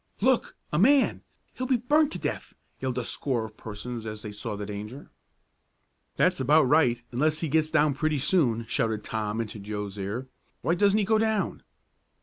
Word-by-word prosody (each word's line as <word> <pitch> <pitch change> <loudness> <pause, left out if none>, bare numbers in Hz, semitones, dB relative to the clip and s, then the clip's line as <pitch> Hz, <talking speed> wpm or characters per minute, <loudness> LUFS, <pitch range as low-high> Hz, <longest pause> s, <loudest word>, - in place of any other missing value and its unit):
"Look! 255 +3 +2 0.2
A 150 - +2
man! 270 +7 +4 0.3
He'll 255 - -4
be 260 -1 +3
burned 295 +6 +3
to - - -3
death!" - - -4 0.2
yelled 130 -1 -2
a 125 - 0
score 120 -4 -1
of 110 -1 -11
persons 115 +2 -6
as 110 -1 -6
they 105 - -6
saw 105 0 -5
the 105 0 -5
danger. 105 +6 -7 1.0
"That's - - +2
about 150 +4 +5
right, 125 -4 +3
unless 150 +5 +1
he 165 - -1
gets 155 +1 +2
down 150 -1 +3
pretty 155 +2 0
soon," 130 -6 +2
shouted 110 -3 -1
Tom 110 0 -3
into 110 -2 -4
Joe's 105 0 -5
ear. 105 +7 -4 0.4
"Why 170 - +2
doesn't 200 +3 +3
he 210 - +2
go 220 +1 +3
down?" 220 -2 0
130 Hz, 180 wpm, -27 LUFS, 110-170 Hz, 1.0 s, about